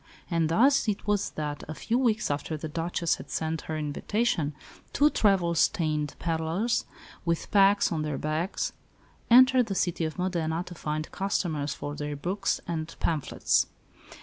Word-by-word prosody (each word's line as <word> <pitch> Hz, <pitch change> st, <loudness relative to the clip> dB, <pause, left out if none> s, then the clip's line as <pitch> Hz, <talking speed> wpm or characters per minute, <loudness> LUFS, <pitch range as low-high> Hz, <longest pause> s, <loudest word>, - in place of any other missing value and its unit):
And 165 Hz, -2 st, +2 dB
thus 265 Hz, +9 st, +4 dB
it 205 Hz, -2 st, -1 dB
was 205 Hz, -1 st, +1 dB
that, 150 Hz, -1 st, -4 dB
a 155 Hz, -, -6 dB
few 230 Hz, -, 0 dB
weeks 230 Hz, -, +1 dB
after 145 Hz, +2 st, -3 dB
the 160 Hz, -, -5 dB
Duchess 165 Hz, +2 st, -1 dB
had -, -, -11 dB
sent 160 Hz, 0 st, -2 dB
her 155 Hz, -, -1 dB
invitation, 155 Hz, +1 st, -1 dB, 0.4 s
two 295 Hz, +1 st, +4 dB
travel 190 Hz, -5 st, +3 dB
stained 155 Hz, -4 st, +1 dB
pedlars, 165 Hz, +7 st, 0 dB, 0.4 s
with 170 Hz, -1 st, -1 dB
packs 200 Hz, 0 st, +5 dB
on 160 Hz, -2 st, -1 dB
their 150 Hz, -2 st, -2 dB
backs, 155 Hz, +5 st, -2 dB, 0.6 s
entered 255 Hz, 0 st, +7 dB
the 195 Hz, -, -3 dB
city 175 Hz, -2 st, 0 dB
of 155 Hz, -, -5 dB
Modena 170 Hz, -2 st, -1 dB
to 180 Hz, -, -9 dB
find 155 Hz, -1 st, -4 dB
customers 160 Hz, -7 st, -1 dB
for 145 Hz, -, -5 dB
their 145 Hz, 0 st, -4 dB
books 190 Hz, +7 st, -1 dB
and 160 Hz, -2 st, -3 dB
phamphlets. 155 Hz, -5 st, +1 dB
170 Hz, 155 wpm, -28 LUFS, 155-200 Hz, 0.6 s, entered